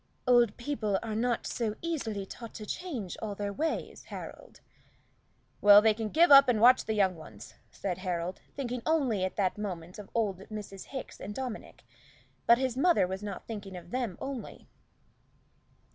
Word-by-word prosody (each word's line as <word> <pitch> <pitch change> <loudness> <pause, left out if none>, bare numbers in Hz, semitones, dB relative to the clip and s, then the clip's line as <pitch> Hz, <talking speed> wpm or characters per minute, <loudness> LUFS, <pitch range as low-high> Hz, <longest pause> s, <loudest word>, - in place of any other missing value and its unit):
"Old 240 -4 +4
people 235 -6 -1
are 225 -2 -4
not 235 +2 0
so 220 -3 -2
easily 230 -12 -2
taught 230 +3 -10
to 215 - -7
change 245 - -5
all 210 -2 -4
their 200 0 -3
ways, 315 +8 -3
Harold." - - -9 1.0
"Well, 205 0 +9
they 220 +1 +4
can 220 0 -4
give 330 +6 +4
up 275 -1 +9
and 230 -3 +3
watch 250 +3 +6
the 220 - -1
young 190 -3 +3
ones," 110 -10 -12 0.2
said 185 -2 -4
Harold, 180 -1 -3
thinking 250 -3 -3
only 265 -11 +1
at 185 - -2
that 195 0 0
moment 180 -3 -5
of 205 - -10
old 205 -5 0
Mrs. 205 -3 -7
Hickes 265 -2 -7
and 205 +1 -7
Dominic. 255 -4 -6 0.6
But 235 - +7
his 260 -1 -1
mother 330 - +4
was 190 +2 -5
not 205 -2 -6
thinking 200 -4 -7
of 175 0 -12
them 240 -8 -2
only. 270 -4 -7
215 Hz, 170 wpm, -30 LUFS, 195-250 Hz, 1.0 s, Well